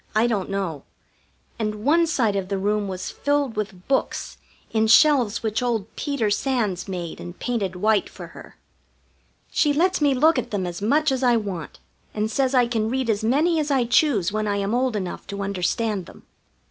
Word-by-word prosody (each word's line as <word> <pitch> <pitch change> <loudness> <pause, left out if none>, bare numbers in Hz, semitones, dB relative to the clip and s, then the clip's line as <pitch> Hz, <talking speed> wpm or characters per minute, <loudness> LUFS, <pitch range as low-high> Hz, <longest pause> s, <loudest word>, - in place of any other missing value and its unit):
I 220 +2 +4
don't 210 -6 -1
know. 190 -7 -3 0.8
And 215 0 -3
one 330 +3 +4
side 230 -10 +1
of 195 -2 -2
the 200 - -1
room 205 +1 0
was 185 -1 -5
filled 285 -4 0
with 195 -4 -5
books 270 - -1 0.3
in 220 0 +2
shelves 245 -4 +4
which 220 +2 -1
old 230 -4 -2
Peter 275 -8 -1
Sands 210 -6 -1
made 175 -3 -5
and 175 0 -9
painted 210 -7 -2
white 210 +3 +1
for - - -10
her. - - -13 0.9
She 295 -2 +2
lets 360 +3 +1
me 285 -2 +3
look 305 +2 +4
at - - -5
them 200 -3 -2
as 175 +1 -5
much 290 +8 +2
as 265 -1 -1
I 245 -2 +4
want, 195 -7 -5 0.4
and 215 +1 -1
says 265 +2 +1
I 250 -1 +5
can 225 -2 -1
read 255 -1 0
as 210 0 -2
many 310 +8 +2
as 300 -1 -1
I 265 -4 +2
choose 235 - +2
when 215 0 -1
I 205 - 0
am 200 +2 -1
old 250 -1 +1
enough 185 -4 -5
to 200 0 -4
understand 200 +1 -1
them. - - -15
220 Hz, 195 wpm, -23 LUFS, 200-265 Hz, 0.9 s, I